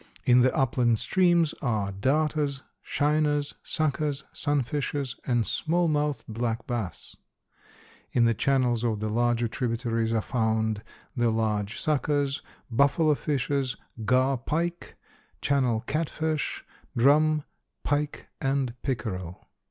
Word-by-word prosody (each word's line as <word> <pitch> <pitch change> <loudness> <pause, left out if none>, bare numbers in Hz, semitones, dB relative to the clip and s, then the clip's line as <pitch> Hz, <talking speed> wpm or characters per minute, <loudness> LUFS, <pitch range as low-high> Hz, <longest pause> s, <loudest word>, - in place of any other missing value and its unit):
In 125 0 +6
the 130 +1 +4
upland 120 -3 +2
streams 175 - +3
are 110 -7 0
darters, 145 +6 0 0.2
shiners, 150 0 +1
suckers, 150 -2 -1
sunfishes 145 -1 -1
and 120 -3 +2
small 170 +2 +1
mouthed 150 -3 0
black 115 +1 -2
bass. 115 -8 -4 1.0
In 120 -2 +3
the 115 - +4
channels 120 0 +1
of 110 -3 0
the 110 0 -2
larger 120 +1 +1
tributaries 115 -1 -1
are 115 - +2
found 110 -2 0 0.3
the 120 -2 +2
large 110 -1 -1
suckers, 145 -2 0 0.3
buffalo 140 +5 +4
fishes, 135 -2 -1 0.3
gar 130 +4 +3
pike, 170 +6 -2 0.4
channel 130 -6 +1
catfish, 155 +1 -2 0.3
drum, 150 +4 +4 0.4
pike 145 0 -1
and 135 -3 0
pickerel. 95 - -4
130 Hz, 110 wpm, -27 LUFS, 115-145 Hz, 1.0 s, In